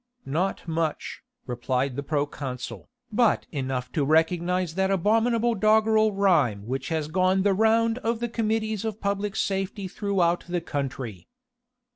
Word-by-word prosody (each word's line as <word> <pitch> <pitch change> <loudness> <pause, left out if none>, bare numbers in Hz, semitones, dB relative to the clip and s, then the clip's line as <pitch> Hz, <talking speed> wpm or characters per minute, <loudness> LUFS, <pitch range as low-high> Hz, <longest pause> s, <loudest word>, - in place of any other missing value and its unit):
"Not 175 +7 -2
much," 160 -1 -2 0.2
replied 125 +2 -1
the 140 - -2
proconsul, 140 -3 -4 0.2
"but 225 0 +2
enough 130 -3 -3
to 150 - 0
recognise 170 +3 +1
that 190 +2 +1
abominable 225 +5 +2
doggrel 215 +1 +3
rhyme 155 - +2
which 130 +4 -3
has 160 -2 -1
gone 185 +3 +2
the 200 -1 +3
round 225 +3 +3
of 230 -2 -1
the 240 - -1
Committees 220 -2 -1
of 220 -1 -4
Public 200 0 -2
Safety 195 0 -2
throughout 185 -3 0
the 175 0 0
country." 135 - -5
185 Hz, 135 wpm, -26 LUFS, 145-215 Hz, 0.2 s, doggrel